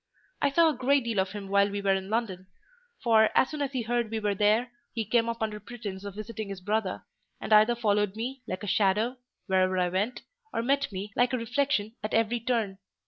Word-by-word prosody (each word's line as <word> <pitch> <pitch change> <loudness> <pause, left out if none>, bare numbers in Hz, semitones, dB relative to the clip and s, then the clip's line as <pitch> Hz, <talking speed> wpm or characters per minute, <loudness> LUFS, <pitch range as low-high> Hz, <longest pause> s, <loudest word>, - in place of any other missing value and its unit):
"I 285 - +3
saw 330 +4 +4
a - - 0
great 275 +1 +2
deal 230 -4 -1
of 190 +1 0
him 205 -2 -6
while 200 +1 +3
we 200 0 -3
were 200 -1 +2
in 190 0 -3
London; 205 -5 -2 0.6
for, 220 -2 +5
as 265 - +4
soon 305 -1 -4
as 280 -1 -1
he 250 -3 -1
heard 235 0 0
we 225 0 -2
were 210 -1 0
there, 215 +5 +2 0.2
he 225 -2 -1
came 230 +2 +2
up 230 0 -3
under 215 -1 -3
pretence 210 -3 -7
of 200 -1 -7
visiting 215 0 -6
his 195 -2 -6
brother, 205 0 -2 0.4
and - - -1
either 215 +3 +6
followed 210 -3 +1
me, 250 +4 -4
like 185 - -4
a - - -4
shadow, 210 +6 +2 0.3
wherever 185 -1 +2
I 180 -1 +2
went, 205 +7 -2 0.3
or 230 - -1
met 275 +1 +1
me, 200 +2 -5
like 245 +1 +2
a - - +2
reflection, 230 -2 0
at 215 - -2
every 225 +1 +2
turn. 225 -5 -1
220 Hz, 225 wpm, -28 LUFS, 200-240 Hz, 0.6 s, either